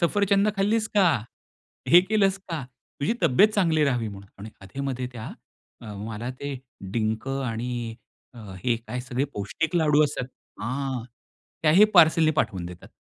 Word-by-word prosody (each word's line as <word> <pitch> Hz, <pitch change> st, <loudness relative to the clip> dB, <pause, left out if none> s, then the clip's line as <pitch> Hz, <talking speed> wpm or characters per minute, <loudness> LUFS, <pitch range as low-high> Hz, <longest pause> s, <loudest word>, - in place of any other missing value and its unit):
सफरचंदं 200 Hz, +3 st, +2 dB
खाल्लीस 215 Hz, +2 st, +1 dB
का? 195 Hz, -4 st, +5 dB, 0.8 s
हे 175 Hz, +2 st, +9 dB
केलंस 195 Hz, 0 st, +2 dB
का? 165 Hz, -6 st, -6 dB, 0.4 s
तुझी 145 Hz, +10 st, +1 dB
तब्येत 195 Hz, +12 st, +6 dB
चांगली 165 Hz, -7 st, +2 dB
राहावी 120 Hz, -5 st, +1 dB
म्हणून. 100 Hz, -1 st, -10 dB
आणि 105 Hz, +2 st, -8 dB
अधे-मध्ये 130 Hz, +4 st, -4 dB
त्या 110 Hz, -2 st, -7 dB, 0.7 s
मला 110 Hz, +3 st, -5 dB
ते 140 Hz, -2 st, -4 dB, 0.3 s
डिंक 110 Hz, +2 st, -1 dB
आणि 120 Hz, -3 st, -3 dB, 0.7 s
हे 120 Hz, -, +2 dB
काय 125 Hz, -, -4 dB
सगळे 130 Hz, +1 st, -2 dB
पौष्टिक 155 Hz, -, -3 dB
लाडू 155 Hz, -2 st, +4 dB
असतात. 140 Hz, -3 st, -2 dB, 0.4 s
हां, 130 Hz, +1 st, -3 dB, 0.6 s
त्याही 165 Hz, +7 st, +6 dB
पार्सलनी 160 Hz, -2 st, +6 dB
पाठवून 95 Hz, -, -1 dB
देतात. 90 Hz, 0 st, -10 dB
140 Hz, 135 wpm, -25 LUFS, 115-175 Hz, 0.8 s, हे